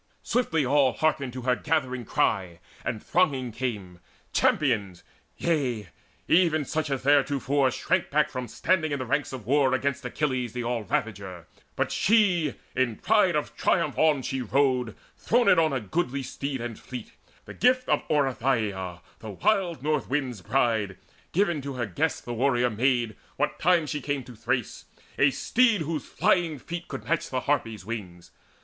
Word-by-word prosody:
Swiftly 160 Hz, -, +1 dB
all 135 Hz, -1 st, +3 dB
Hearkened 140 Hz, -1 st, 0 dB
her 125 Hz, 0 st, +1 dB
gathering 130 Hz, -6 st, -1 dB
ery, 95 Hz, -5 st, +1 dB, 0.3 s
and 110 Hz, -3 st, -3 dB
thronging 140 Hz, -9 st, +1 dB
came, 105 Hz, -7 st, -4 dB, 0.3 s
Champions, 105 Hz, -, +1 dB, 0.3 s
yea, 125 Hz, -, -1 dB, 0.4 s
even 165 Hz, -4 st, +3 dB
such 155 Hz, +1 st, -2 dB
as 135 Hz, -2 st, -2 dB
theretofore 140 Hz, -1 st, +3 dB
Shrank 130 Hz, -, 0 dB
back 150 Hz, +1 st, +2 dB
from 125 Hz, -1 st, -4 dB
standing 155 Hz, +5 st, 0 dB
in 145 Hz, -, 0 dB
the 130 Hz, -, -4 dB
ranks 140 Hz, +4 st, -1 dB
of 130 Hz, -5 st, -7 dB
war 135 Hz, +1 st, +3 dB
Against 140 Hz, +1 st, -1 dB
Achilles 125 Hz, -2 st, -2 dB
the 125 Hz, -1 st, -3 dB
all 120 Hz, -1 st, -1 dB
ravager. 95 Hz, -6 st, -3 dB, 0.3 s
But -, -, -1 dB
she 180 Hz, -, +3 dB, 0.2 s
in 125 Hz, -3 st, +1 dB
pride 210 Hz, -, +3 dB
of 150 Hz, -, -2 dB
triumph -, -, +1 dB
on 150 Hz, -4 st, +3 dB
she 135 Hz, +1 st, -2 dB
rode 125 Hz, -2 st, +1 dB, 0.2 s
Throned 235 Hz, -6 st, +4 dB
on 160 Hz, -2 st, +3 dB
a 135 Hz, -, 0 dB
goodly 135 Hz, -, -2 dB
steed 135 Hz, 0 st, -4 dB
and 120 Hz, -2 st, -5 dB
fleet, 125 Hz, -3 st, -8 dB, 0.3 s
the -, -, -9 dB
gift 255 Hz, 0 st, +2 dB
Of -, -, +2 dB
Oreithyia, 115 Hz, -, 0 dB, 0.2 s
the 110 Hz, -, -8 dB
wild 170 Hz, -, 0 dB
North 150 Hz, -1 st, 0 dB
wind's 130 Hz, -6 st, -2 dB
bride, 110 Hz, -3 st, 0 dB, 0.3 s
Given 175 Hz, -5 st, +1 dB
to 140 Hz, 0 st, -5 dB
her 125 Hz, -2 st, -2 dB
guest 95 Hz, -5 st, -2 dB
the 120 Hz, -, -4 dB
warrior 125 Hz, 0 st, +2 dB
maid, 120 Hz, -1 st, +1 dB, 0.2 s
what 150 Hz, +1 st, -1 dB
time 175 Hz, -1 st, +3 dB
She 150 Hz, 0 st, -3 dB
came 140 Hz, 0 st, -2 dB
to 125 Hz, -, -12 dB
Thrace, 120 Hz, +2 st, -2 dB, 0.3 s
a 140 Hz, -, +6 dB
steed 230 Hz, -, +2 dB
whose 160 Hz, 0 st, -3 dB
flying 175 Hz, -4 st, +1 dB
feet 170 Hz, +6 st, -7 dB
Could -, -, -6 dB
match 165 Hz, 0 st, -1 dB
the 130 Hz, -1 st, -1 dB
Harpies' 115 Hz, -9 st, -1 dB
wings. 95 Hz, -6 st, -7 dB
135 Hz, 160 wpm, -26 LUFS, 120-155 Hz, 0.4 s, a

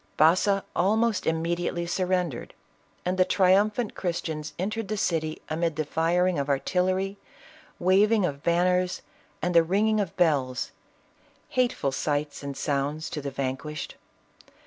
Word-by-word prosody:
Baza 185 Hz, +5 st, +4 dB
almost 215 Hz, +2 st, +2 dB
immediately 170 Hz, +1 st, -1 dB
surrendered, 180 Hz, -5 st, -1 dB, 0.5 s
and 185 Hz, +1 st, -1 dB
the -, -, +7 dB
triumphant 205 Hz, +5 st, +2 dB
Christians 165 Hz, -4 st, -4 dB
entered 215 Hz, +4 st, -2 dB
the 215 Hz, +2 st, -2 dB
city 160 Hz, -4 st, -1 dB
amid 165 Hz, 0 st, -1 dB
the 155 Hz, -, -1 dB
firing 170 Hz, +2 st, +1 dB
of 140 Hz, +1 st, -2 dB
artillery, 185 Hz, +7 st, 0 dB, 0.6 s
waving 200 Hz, +3 st, +4 dB
of 140 Hz, -4 st, -3 dB
banners 180 Hz, +2 st, +1 dB, 0.4 s
and 180 Hz, -, +1 dB
the 170 Hz, -, +7 dB
ringing 210 Hz, +6 st, +2 dB
of 200 Hz, -, -3 dB
bells 140 Hz, -7 st, +1 dB, 0.4 s
— -, -, -36 dB, 0.3 s
hateful 245 Hz, -, 0 dB
sights 145 Hz, +1 st, -2 dB
and 140 Hz, -1 st, -6 dB
sounds 145 Hz, +2 st, -2 dB
to 150 Hz, -, -4 dB
the 140 Hz, -, -3 dB
vanquished. 135 Hz, +3 st, -4 dB
175 Hz, 130 wpm, -26 LUFS, 155-190 Hz, 0.6 s, the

